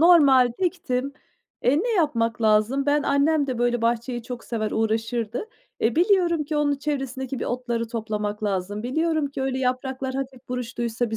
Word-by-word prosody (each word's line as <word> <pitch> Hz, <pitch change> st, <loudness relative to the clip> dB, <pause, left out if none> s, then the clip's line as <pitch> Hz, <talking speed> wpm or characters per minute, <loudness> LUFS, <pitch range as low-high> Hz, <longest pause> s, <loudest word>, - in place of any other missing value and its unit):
Normal 280 Hz, -8 st, +6 dB
diktim. 280 Hz, -8 st, -1 dB, 0.5 s
Eee, 275 Hz, +5 st, +3 dB
ne 485 Hz, -, -1 dB
yapmak 230 Hz, -8 st, +1 dB
lazım? 220 Hz, +6 st, +3 dB
Ben 290 Hz, 0 st, +3 dB
annem 280 Hz, +1 st, +2 dB
de, 255 Hz, -3 st, -3 dB
böyle, 240 Hz, -1 st, +1 dB
bahçeyi 235 Hz, +1 st, 0 dB
çok 245 Hz, 0 st, -7 dB
sever, 215 Hz, -2 st, -2 dB
uğraşırdı. 225 Hz, -, -1 dB, 0.3 s
Eee, 225 Hz, +4 st, +1 dB
biliyorum 345 Hz, -4 st, +3 dB
ki 300 Hz, +1 st, -3 dB
onun 290 Hz, -1 st, +2 dB
çevresindeki 270 Hz, -3 st, -3 dB
bir -, -, -3 dB
otları 240 Hz, -2 st, -2 dB
toplamak 215 Hz, -2 st, -3 dB
lazım. 200 Hz, +1 st, -2 dB
Biliyorum 315 Hz, +4 st, 0 dB
ki 270 Hz, -, -4 dB
öyle 265 Hz, -1 st, -1 dB
yapraklar 260 Hz, +1 st, -2 dB
hafif 265 Hz, -2 st, -5 dB
buruştuysa 240 Hz, -2 st, -2 dB
bir 220 Hz, -, -2 dB
255 Hz, 160 wpm, -24 LUFS, 230-285 Hz, 0.5 s, Normal